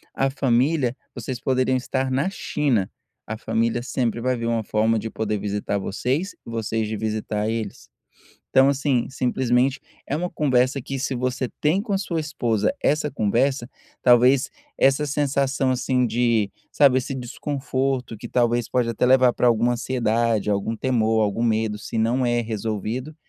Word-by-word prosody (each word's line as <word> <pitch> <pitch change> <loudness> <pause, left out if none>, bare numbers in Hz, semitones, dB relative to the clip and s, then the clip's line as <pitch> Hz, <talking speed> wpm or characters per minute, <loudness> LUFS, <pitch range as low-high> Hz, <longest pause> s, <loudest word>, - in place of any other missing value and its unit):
a 135 - +1
família, 135 0 +1 0.2
vocês 120 0 -5
poderiam 130 0 +1
estar 130 +1 -2
na 140 +8 +1
China, 140 - 0 0.4
a 110 0 -4
família 115 +1 -1
sempre 120 -2 -1
vai 125 0 0
vir 115 - -3
uma 115 -1 0
forma 110 +2 +1
de 115 - -4
poder 110 -1 -2
visitar 100 0 -2
vocês, 130 - -2
vocês 115 -1 -2
de 110 - -3
visitar 110 0 -2
eles. 110 -3 -5 0.6
Então 135 +1 +5
assim 135 -3 +1
simplesmente 130 0 +1 0.3
é 145 - -1
uma 175 +3 -2
conversa 130 -2 +1
que 135 +2 -4
se 130 +1 -2
você 125 0 -2
tem 160 +7 +2
com 215 -2 -4
a 195 - +2
sua 180 -4 -3
esposa 120 -9 0
essa 150 0 +1
conversa, 120 +2 0 0.3
talvez 125 +2 +5 0.3
essa 135 +2 +3
sensação, 140 -1 0
assim, 125 0 +1
de, 115 -3 +1 0.2
sabe, 140 -3 +5
esse 130 +1 -4
desconforto 130 -1 -3
que - - -7
talvez 120 -1 +1
pode 125 -2 +1
até 115 - 0
levar 130 -1 +5
para - - +1
alguma 120 +1 +3
ansiedade, 115 -3 0
algum 100 +3 -1
temor, 110 -3 +1
algum 105 +2 0
medo 110 -2 0
se 110 - -5
não 120 +3 +1
é 120 0 +2
resolvido, 110 +5 -4
125 Hz, 160 wpm, -23 LUFS, 115-135 Hz, 0.6 s, Então